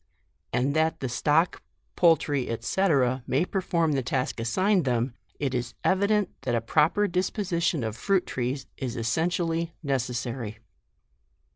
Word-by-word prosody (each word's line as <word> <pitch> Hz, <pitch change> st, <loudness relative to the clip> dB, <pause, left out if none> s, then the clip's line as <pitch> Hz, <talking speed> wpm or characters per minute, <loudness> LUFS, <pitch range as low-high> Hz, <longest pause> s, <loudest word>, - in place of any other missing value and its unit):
And 130 Hz, +4 st, +1 dB
that 160 Hz, +1 st, +2 dB
the 130 Hz, -, -2 dB
stock, 150 Hz, +7 st, +1 dB, 0.3 s
poultry, 150 Hz, -6 st, +3 dB
&c. 190 Hz, +12 st, +1 dB, 0.4 s
may 140 Hz, +7 st, +2 dB
perform 175 Hz, -5 st, 0 dB
the 135 Hz, -2 st, +1 dB
task 125 Hz, 0 st, -2 dB
assigned 185 Hz, -, +2 dB
them, 120 Hz, -1 st, 0 dB, 0.3 s
it 140 Hz, -3 st, -1 dB
is 120 Hz, -2 st, -3 dB
evident 200 Hz, +1 st, +2 dB
that -, -, -1 dB
a -, -, +2 dB
proper 160 Hz, -, +2 dB
dis 180 Hz, +1 st, 0 dB
position 170 Hz, -, -1 dB
of 110 Hz, -1 st, -3 dB
fruit 195 Hz, +6 st, +1 dB
trees 130 Hz, +2 st, -3 dB
is 125 Hz, -2 st, -4 dB
essentially, 165 Hz, +7 st, 0 dB
necessa 125 Hz, -3 st, -1 dB
iy. 110 Hz, -4 st, -6 dB
145 Hz, 140 wpm, -27 LUFS, 125-175 Hz, 0.4 s, poultry